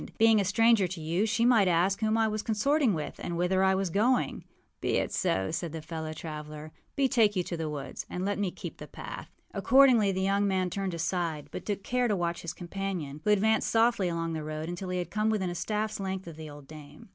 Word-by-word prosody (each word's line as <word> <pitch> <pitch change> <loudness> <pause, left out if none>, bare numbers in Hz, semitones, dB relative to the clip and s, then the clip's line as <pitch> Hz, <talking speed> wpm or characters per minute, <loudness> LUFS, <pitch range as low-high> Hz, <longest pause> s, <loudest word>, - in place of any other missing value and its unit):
Being 225 -1 +5
a - - -1
stranger 220 0 +4
to 175 0 -6
you, 170 +7 0
she 230 +2 +1
might 230 -6 +5
ask 180 +3 +2
whom 220 0 +1
I 225 -1 +3
was 215 0 -2
consorting 235 - +2
with 155 - -5
and 170 - -3
whither 185 +2 +2
I 190 0 +4
was 190 -2 -1
going.â 210 - +1 0.4
âBe - - 0
it - - 0
so,â 95 +8 0
said 165 0 -3
his 160 -1 -7
fellow 160 -1 -5
traveller. 155 -1 -7 0.3
âBetake 245 -6 +3
you 180 - +1
to 175 - -4
the 160 -2 -3
woods, 145 -2 -6
and 180 +1 -3
let 205 0 -1
me 200 -2 0
keep - - -8
the - - -9
path.â - - -8 0.3
Accordingly 255 -7 +5
the 190 0 -2
young 200 +1 +2
man 185 -2 0
turned 195 -2 -2
aside, 165 -2 -2
but - - -7
took 200 -2 -2
care 250 +2 +1
to 210 - +1
watch 170 -2 -2
his 170 0 -5
companion, 175 -5 -5
who - - 0
advanced 215 +2 +3
softly 225 -5 +3
along 165 -1 -2
the 155 -1 -3
road 155 +1 -4
until 175 +2 -5
he 180 - -1
had 175 -1 -4
come 215 +1 +1
within 195 -5 0
a - - -4
staffâs 210 +4 -2
length 190 -1 -3
of 165 -2 -9
the 155 -1 -8
old 145 -1 -12
dame. 155 +4 -13
190 Hz, 235 wpm, -29 LUFS, 165-215 Hz, 0.4 s, Being